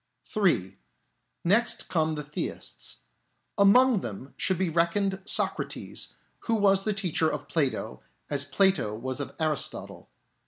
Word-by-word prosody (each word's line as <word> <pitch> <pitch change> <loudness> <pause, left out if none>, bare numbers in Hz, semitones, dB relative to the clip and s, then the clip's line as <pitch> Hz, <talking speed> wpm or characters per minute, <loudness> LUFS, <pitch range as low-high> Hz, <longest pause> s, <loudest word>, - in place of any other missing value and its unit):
(3) 180 - +1 0.6
Next 215 +7 +2
come 160 -2 +1
the 150 - -4
Theists. 150 +1 -5 0.5
Among 220 +2 +5
them 120 +5 -7
should 190 - +1
be 190 - +1
reckoned 180 +4 +1
Socrates, - - -1 0.2
who 230 - 0
was 195 -2 +3
the 215 - +1
teacher 180 -5 +1
of - - -5
Plato 145 - -1 0.3
as 140 -1 0
Plato 145 - +2
was 130 +4 -4
of 140 - -5
Aristotle. 155 -3 -2
170 Hz, 125 wpm, -28 LUFS, 145-200 Hz, 0.6 s, Among